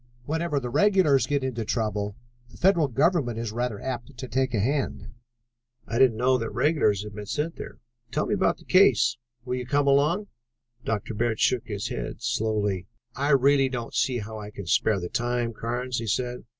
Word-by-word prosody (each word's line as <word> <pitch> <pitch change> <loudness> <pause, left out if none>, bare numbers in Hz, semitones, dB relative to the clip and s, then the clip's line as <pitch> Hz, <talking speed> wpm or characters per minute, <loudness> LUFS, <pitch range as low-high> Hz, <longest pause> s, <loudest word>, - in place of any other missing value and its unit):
Whenever 160 0 -1
the 125 -2 -5
regulars 160 -3 +4
get 145 -2 0
into 125 -3 -2
trouble, 105 -3 -2 0.3
the 115 - -15
federal 175 -5 +3
government 140 -2 +1
is 115 -2 -3
rather 120 -2 -2
apt 130 0 -5
to 130 - -6
take 130 +1 0
a 110 - 0
hand." 135 +7 -1 0.8
"I 115 - -1
didn't 125 -4 +5
know 130 +2 +3
that 115 - -3
regulars 115 - +1
had 105 0 -8
been 105 0 -7
sent 155 +8 -2
there. - - -8 0.3
Tell 150 - 0
me - - -1
about 195 -2 +2
the - - -19
case." 185 - +4 0.3
"Will 125 0 -2
you 125 -1 -5
come 145 +2 +2
along?" 150 +9 +3 0.6
Dr. 110 +1 -2
Bird 110 0 -1
shook 120 -2 +2
his 100 -3 -3
head - - -5
slowly. 105 -4 -1 0.3
"I 140 +3 -1
really 140 -1 +4
don't 120 -3 -5
see 130 -2 +1
how 110 0 -6
I 105 -1 -7
can 100 -2 -8
spare 100 +4 +2
the 90 - -4
time, 120 +2 -1
Carnes," 120 +2 -3
he 115 - -5
said. 125 +3 -2
125 Hz, 190 wpm, -26 LUFS, 110-140 Hz, 0.8 s, didn't